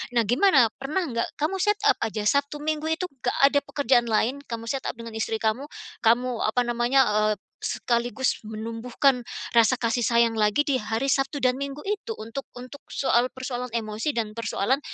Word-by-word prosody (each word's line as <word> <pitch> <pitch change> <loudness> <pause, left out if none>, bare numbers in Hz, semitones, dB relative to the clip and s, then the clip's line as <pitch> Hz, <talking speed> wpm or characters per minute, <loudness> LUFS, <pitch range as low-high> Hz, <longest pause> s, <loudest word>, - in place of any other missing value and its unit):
Nah, 235 -2 +3
gimana, 250 - +4
pernah 310 +7 -2
nggak, 235 -4 -3
kamu 310 +6 -1
set 415 0 +2
up 420 - +5
aja, 215 -2 -2
Sabtu 280 +5 +1
Minggu 310 0 -1
itu 320 +3 -1
enggak 265 - -3
ada 285 +1 +4
pekerjaan 260 -4 +1
lain, 240 +5 +1
kamu 230 -1 -5
set 270 +2 -2
up - - -6
dengan 230 -1 -8
istri 220 0 -2
kamu, 225 +6 -1 0.3
kamu 240 +1 +2
apa 235 +3 +2
namanya, 240 +3 +3 0.3
eee, - - -6 0.3
sekaligus 240 0 -1
menumbuhkan 230 +4 0 0.3
rasa 235 +2 +5
kasih 235 +1 0
sayang 235 -1 +3
lagi 215 +7 +2
di 280 - +2
hari 225 +4 -2
Sabtu 270 +1 0
dan 255 -1 +2
Minggu 280 +1 -4
itu 420 +2 -2
untuk 230 +5 -6 0.2
untuk 255 +3 -11
soal 250 -2 +2
persoalan 250 -1 -5
emosi 225 +4 -2
dan 220 -4 -3
persoalan 230 +3 0
245 Hz, 175 wpm, -25 LUFS, 230-280 Hz, 0.3 s, up